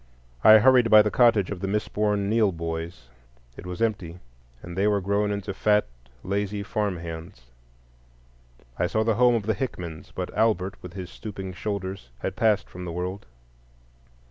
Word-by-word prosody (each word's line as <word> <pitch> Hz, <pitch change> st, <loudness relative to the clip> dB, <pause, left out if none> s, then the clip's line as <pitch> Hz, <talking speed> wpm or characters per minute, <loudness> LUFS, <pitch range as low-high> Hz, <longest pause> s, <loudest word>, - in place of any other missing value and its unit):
I 110 Hz, 0 st, +9 dB
hurried 125 Hz, +1 st, +5 dB
by 110 Hz, -1 st, +8 dB
the 105 Hz, -, -1 dB
cottage 115 Hz, -6 st, +3 dB
of 100 Hz, -, -4 dB
the 95 Hz, -, -3 dB
misborn 105 Hz, 0 st, 0 dB
Neill 110 Hz, -1 st, +3 dB
boys. 80 Hz, -4 st, -6 dB, 0.5 s
It -, -, -10 dB
was 90 Hz, +4 st, -3 dB
empty, 100 Hz, -7 st, -2 dB, 0.5 s
and 85 Hz, 0 st, -8 dB
they 100 Hz, +2 st, +2 dB
were 105 Hz, -1 st, +2 dB
grown 100 Hz, +2 st, 0 dB
into 100 Hz, -1 st, -4 dB
fat, 105 Hz, +2 st, +2 dB, 0.4 s
lazy 100 Hz, +1 st, -2 dB
farm 105 Hz, -3 st, -2 dB
hands. 85 Hz, -2 st, -8 dB, 1.4 s
I 90 Hz, -, +2 dB
saw 110 Hz, +4 st, 0 dB
the 115 Hz, 0 st, +2 dB
home 125 Hz, -1 st, +6 dB
of 110 Hz, -3 st, -2 dB
the 110 Hz, -, +1 dB
Hickmans, 90 Hz, -8 st, -6 dB
but -, -, -5 dB
Albert, 100 Hz, -4 st, +1 dB
with 90 Hz, -1 st, -10 dB
his 95 Hz, -2 st, -7 dB
stooping 95 Hz, -3 st, -7 dB
shoulders, 95 Hz, -, -5 dB
had 95 Hz, +9 st, -4 dB
passed 110 Hz, -4 st, +2 dB
from 90 Hz, -, -9 dB
the 90 Hz, -, -5 dB
world. 90 Hz, +3 st, -5 dB
100 Hz, 170 wpm, -25 LUFS, 90-105 Hz, 1.4 s, I